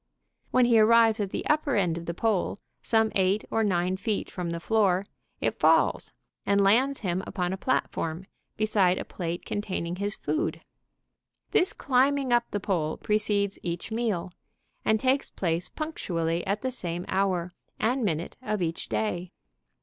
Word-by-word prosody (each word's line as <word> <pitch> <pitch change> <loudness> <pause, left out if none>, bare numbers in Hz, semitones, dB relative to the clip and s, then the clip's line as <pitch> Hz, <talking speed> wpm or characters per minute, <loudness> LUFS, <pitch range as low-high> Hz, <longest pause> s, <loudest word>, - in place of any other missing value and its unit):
When 255 -1 +4
he 235 -2 +5
arrives 225 0 +5
at 200 -2 -1
the - - -4
upper 300 -2 +1
end 180 -5 +2
of 170 0 -7
the 170 - -3
pole, 210 -2 0 0.2
some 220 -1 +2
eight 195 +2 +2
or 225 - +2
nine 185 -3 +1
feet 210 +1 -2
from 180 -2 -4
the 170 0 -3
floor, 195 -1 +2 0.4
it - - -1
falls - - +3 0.3
and 200 0 +2
lands 245 +8 +3
him 185 -3 -1
upon 180 -2 -2
a - - -3
platform, 180 -7 -1 0.3
beside 200 -4 +3
a - - -4
plate 170 0 -5
containing 185 -4 -3
his 205 +2 -2
food. 330 +3 -2 0.9
This 385 -4 +3
climbing 270 0 +2
up 240 0 +2
the 205 - -2
pole 170 -6 -1
precedes 205 -1 0
each 170 +4 -4
meal, 220 -6 -1 0.5
and 220 0 +2
takes 265 +3 +1
place 170 -1 -2
punctually 170 - -2
at 200 +4 -1
the 260 - -1
same 175 -7 -4
hour 185 -2 0 0.2
and 245 +3 +1
minute 170 -4 -2
of 215 -6 -1
each 165 0 -3
day. 180 -5 -2
200 Hz, 160 wpm, -27 LUFS, 175-225 Hz, 0.9 s, he